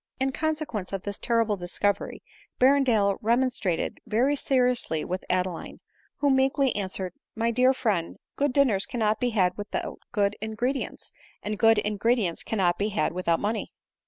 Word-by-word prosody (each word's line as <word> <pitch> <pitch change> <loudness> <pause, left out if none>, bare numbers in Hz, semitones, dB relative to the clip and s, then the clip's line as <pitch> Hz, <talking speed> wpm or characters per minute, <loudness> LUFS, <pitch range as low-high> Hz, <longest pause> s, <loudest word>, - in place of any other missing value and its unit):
In 265 0 +1
consequence 305 - -3
of 195 -1 -3
this 200 -1 -5
terrible 230 -3 +1
discovery 185 +3 -2 0.4
Berrendale 250 -7 +4
remonstrated 235 -6 0
very 255 +7 +2
seriously 250 - +1
with 185 +1 -4
Adeline; 180 -1 -2 0.4
who 285 -1 +4
meekly 265 0 +2
answered, 190 -2 -3
" - - -65
My 230 +1 +1
dear 250 +2 +4
friend, 210 -10 -1 0.2
good 285 -1 +1
dinners 250 -8 +2
cannot 220 -3 0
be 250 - +1
had 185 -5 +1
without 205 0 -4
good 205 -3 +1
ingredients, 235 +5 -3 0.3
and 210 +1 -2
good 225 -1 +5
ingredients 210 -2 +1
cannot 180 -5 0
be 205 +1 0
had 210 - 0
without 170 -2 0
money." 215 +2 -2
220 Hz, 150 wpm, -26 LUFS, 195-255 Hz, 0.4 s, good